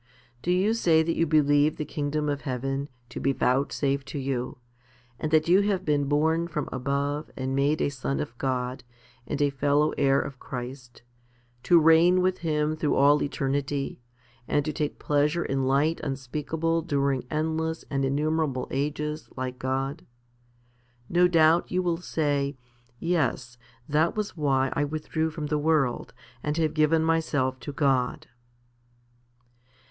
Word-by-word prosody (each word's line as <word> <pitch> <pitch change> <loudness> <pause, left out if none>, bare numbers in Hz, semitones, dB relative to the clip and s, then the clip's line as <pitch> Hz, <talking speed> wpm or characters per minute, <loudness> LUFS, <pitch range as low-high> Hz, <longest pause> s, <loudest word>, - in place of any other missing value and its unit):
Do - - -4
you 185 +5 +3
say 165 -8 +3
that 165 +1 -1
you 165 - +1
believe 145 0 +3
the 150 - -3
kingdom 150 +1 -2
of 145 -1 -1
heaven 135 +2 -3 0.2
to - - -6
be 135 +2 +1
vouchsafed 135 +1 0
to 140 - -5
you, 130 -3 -3 0.6
and 155 - -2
that 155 0 +3
you 185 +3 +5
have 200 -2 0
been 145 -2 +1
born 160 +4 +1
from 150 -4 -3
above 140 +3 -2
and 130 0 -2
made 145 +3 +2
a - - +1
son 140 0 -3
of 145 -5 -4
God, 125 -1 -2 0.4
and - - -3
a 145 - +2
fellow 145 +2 +2
heir 140 -1 +4
of 135 -3 -5
Christ, 125 -1 -8 0.6
to 175 +5 +5
reign 165 +3 +5
with 185 0 +1
Him 155 -2 0
through 155 -1 0
all 145 +1 +5
eternity, 140 -1 -2 0.5
and 145 -1 +1
to 155 - -2
take 150 0 -2
pleasure 150 +3 +1
in 135 -1 -1
light 145 +5 +2
unspeakable 150 +5 -2
during 140 -4 0
endless 160 +1 -2
and 135 -1 0
innumerable 145 0 0
ages 150 +2 -3
like 130 0 -4
God? 135 +1 -3 1.0
No 180 +1 +4
doubt 165 -1 +4
you 185 0 0
will 170 -2 0
say, 145 -5 -1 0.4
"Yes; 135 -8 -1 0.3
that 155 +3 +2
was 210 -3 -3
why 135 -4 +1
I 145 - 0
withdrew 155 +2 -2
from 155 -1 -5
the 150 0 0
world 150 -5 +1 0.3
and 150 +2 -2
have 160 -2 +1
given 155 +1 +3
myself 145 -5 0
to 130 - -6
God." 135 -4 0
145 Hz, 150 wpm, -26 LUFS, 135-160 Hz, 1.0 s, you